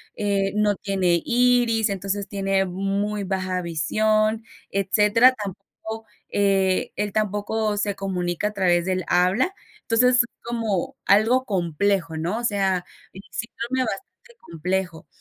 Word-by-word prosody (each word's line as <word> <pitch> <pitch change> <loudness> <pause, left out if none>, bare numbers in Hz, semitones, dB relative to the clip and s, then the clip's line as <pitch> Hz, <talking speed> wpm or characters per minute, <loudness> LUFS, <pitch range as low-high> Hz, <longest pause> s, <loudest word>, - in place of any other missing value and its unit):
eh, 200 -1 0
no 210 -1 +2
tiene 185 -4 0
iris, 240 -2 +3
entonces 195 0 -2
tiene 195 -1 0
muy 195 +3 -2
baja 185 -1 -2
visión, 215 +7 +1 0.3
etcétera, 210 +5 +4
tampoco, 220 +3 -8 0.2
eh, 195 -2 +1
él 205 -1 -2
tampoco 210 0 -1
se 205 -1 0
comunica 180 0 -2
a 210 - -5
través 175 -3 +2
del 185 -2 -1
habla, 190 - +2 0.3
entonces 250 +2 +4
es 245 - +6 0.2
como 225 -6 -2
algo 230 +6 +4
complejo, 175 -2 0
¿no?, 175 +8 -2
o - - -6
sea, 195 -4 +1 0.9
bastante 260 - -4
complejo, 175 0 -3
200 Hz, 120 wpm, -23 LUFS, 185-220 Hz, 0.9 s, es